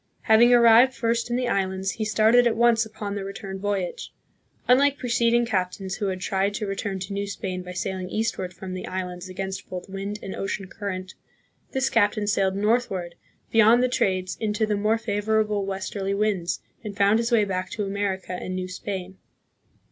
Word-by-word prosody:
Having 230 +2 +5
arrived 240 +2 +6
first 235 0 0
in 240 - 0
the 250 0 0
islands, 190 -2 0
he 220 - -3
started 220 +3 +4
at 235 - +1
once 230 -1 +3
upon 210 -2 -6
the 200 -1 -4
return 195 0 -6
voyage. 195 -3 -3 0.6
Unlike 280 +3 +4
preceding 235 -1 +2
captains 190 -3 -2
who 205 - -1
had 185 -1 -3
tried 195 +2 0
to 215 - -2
return 195 0 -3
to 195 +2 -5
New 200 0 -2
Spain 185 -2 -4
by 180 0 -8
sailing 185 0 -3
eastward 215 -4 -2
from 185 +1 -8
the 185 - -5
islands 180 0 -5
against 190 +1 -5
both 180 -1 -6
wind 195 +2 -5
and 195 - -5
ocean 195 0 -3
current, 190 -2 -5 0.6
this 265 -1 +1
captain 210 -1 +2
sailed 195 -2 +1
northward 200 -4 0 0.4
beyond 225 +2 +6
the - - +4
trades 185 -6 0
into 215 0 0
the 210 -1 0
more 210 +2 +2
favorable 215 -1 0
westerly 195 0 -3
winds, 195 -5 0 0.2
and 205 -2 -7
found 205 +2 +4
his 235 +1 -1
way 220 -3 +4
back 185 -1 -3
to 210 - -3
America 195 -2 -2
and 185 +1 -4
New 185 0 -3
Spain. 190 0 -6
200 Hz, 180 wpm, -25 LUFS, 190-225 Hz, 0.6 s, arrived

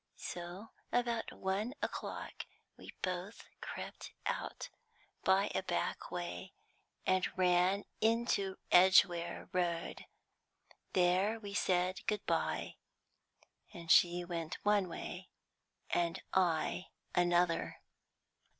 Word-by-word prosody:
So, 175 +5 -6 0.2
about 235 -2 0
one 200 +7 -2
o'clock, - - -4 0.3
we - - -11
both 185 +3 -3
crept - - -7
out - - -3 0.5
by 195 +2 +3
a - - +1
back 180 -2 -2
way, 180 +1 -5 0.5
and 185 0 +2
ran 185 +2 +3
into 220 -4 +1
Edgware 175 -2 +5
Road. 175 -2 -1 0.9
There 185 +5 +3
we 205 -2 -7
said 185 -1 +1
good 210 -2 0
bye, - - -1 1.0
and 170 -2 -3
she 175 0 +5
went 170 -2 -4
one 205 -3 +3
way, 180 +2 -6 0.6
and 170 -1 +1
I 180 -1 +1 0.3
another. 175 -1 +2
185 Hz, 95 wpm, -35 LUFS, 175-200 Hz, 1.0 s, Edgware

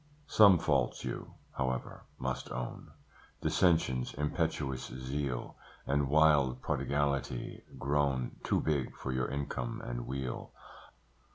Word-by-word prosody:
Some 105 -9 +7
faults 70 -6 +1
you, - - -5 0.2
however, 65 -2 -2
must 65 0 -3
own; 60 0 -5 0.5
Dissensions, 80 -9 +2
impetuous 70 -2 -1
zeal, 65 0 -3 0.3
And 70 0 +1
wild 75 -4 +5
prodigality, 70 -2 -1 0.2
grown 70 -3 0
Too - - +2
big 75 -5 0
for 65 - -4
your 65 -1 0
income 70 -3 -3
and - - -4
weal. 65 -1 -4
70 Hz, 105 wpm, -32 LUFS, 65-75 Hz, 0.5 s, Some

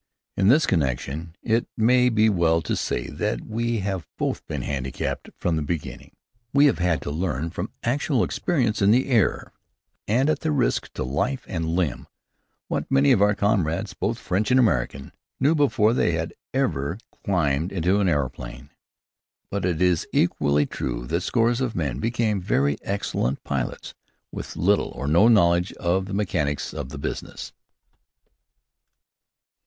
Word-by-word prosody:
In 95 - +2
this 145 +8 +5
connection, 75 +2 -1
it 115 0 +1
may 125 +2 +4
be 110 -2 +3
well 85 -5 +2
to - - -1
say - - -2
that - - -2
we 115 0 -1
have 95 -3 -3
both - - -2
been - - -4
handicapped 65 -2 -3
from 85 -2 0
the - - -1
beginning. 75 +1 -5 0.4
We 140 +1 +6
have 140 - +3
had 90 -2 +1
to - - -4
learn, 80 -1 -2
through 90 +4 -4
actual 130 0 +1
experience 120 -11 0
in 100 - +5
the 125 +5 +3
air, 115 -7 +1 0.5
and 125 +7 +2
at 155 - 0
risk 150 -5 0
to - - -3
life 95 - -2
and 80 -3 -3
limb, 85 -9 -1 0.6
what - - -3
many 135 +1 +4
of 115 -6 +4
our 105 0 +4
comrades, 95 -6 0
both - - -2
French 100 +6 -1
and 130 +1 +5
American, 70 - 0 0.3
knew 140 +5 +4
before 125 -8 +3
they 90 -8 +2
had 80 0 -2 0.2
ever 95 - -1 0.3
climbed 80 -3 0
into 95 +2 +1
an 95 -3 +2
aeroplane. 70 -2 -3 0.8
But 100 -2 -1
it 90 -1 +1
is 90 -3 +2
equally 70 0 +2
true - - -4
that 85 +8 -1
scores 120 +5 +1
of 125 -4 -1
men 70 -7 -2
become 115 -1 0
very 70 -6 +1
excellent 100 -9 -2
pilots 70 -3 -3 0.4
with - - -7
little 100 +4 +2
or 65 - -5
no 85 +9 +5
knowledge 90 -5 +4
of 95 +2 -1
the 100 - -4
mechanics 80 -8 -1
of 65 - -5
the 75 - -7
business. 70 - -6
95 Hz, 160 wpm, -24 LUFS, 75-115 Hz, 0.8 s, We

